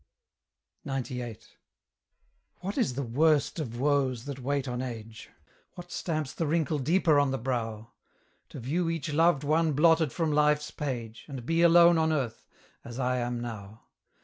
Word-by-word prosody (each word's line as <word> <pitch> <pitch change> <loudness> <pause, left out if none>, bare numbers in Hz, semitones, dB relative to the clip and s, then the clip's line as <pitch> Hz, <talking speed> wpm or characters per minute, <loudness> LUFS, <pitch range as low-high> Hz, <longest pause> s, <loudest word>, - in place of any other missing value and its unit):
XCVIII. 125 -4 -5 1.2
What 195 +3 -4
is 225 - 0
the 140 - -2
worst 150 +6 +2
of 120 -6 -5
woes 135 -3 +1
that 140 -1 -6
wait 140 +1 -1
on 125 0 -3
age? 115 -3 -7 0.5
What 175 0 -10
stamps 155 -5 -3
the 165 - -2
wrinkle 155 -1 0
deeper 160 +1 +3
on 145 -1 +2
the 135 - -1
brow? 115 -3 -3 0.6
To - - -9
view 165 +8 -1
each 160 -2 -3
loved 160 -2 +3
one 155 +1 +2
blotted 160 0 +4
from 160 +2 -1
life's 150 0 +2
page, 120 -6 -5
And 135 -5 -7
be 165 +3 +1
alone 170 0 +6
on 160 0 +2
earth, 130 -7 -3 0.4
as 120 0 -9
I 125 -1 0
am 120 0 -2
now. 110 -2 -8
140 Hz, 155 wpm, -28 LUFS, 125-160 Hz, 1.2 s, alone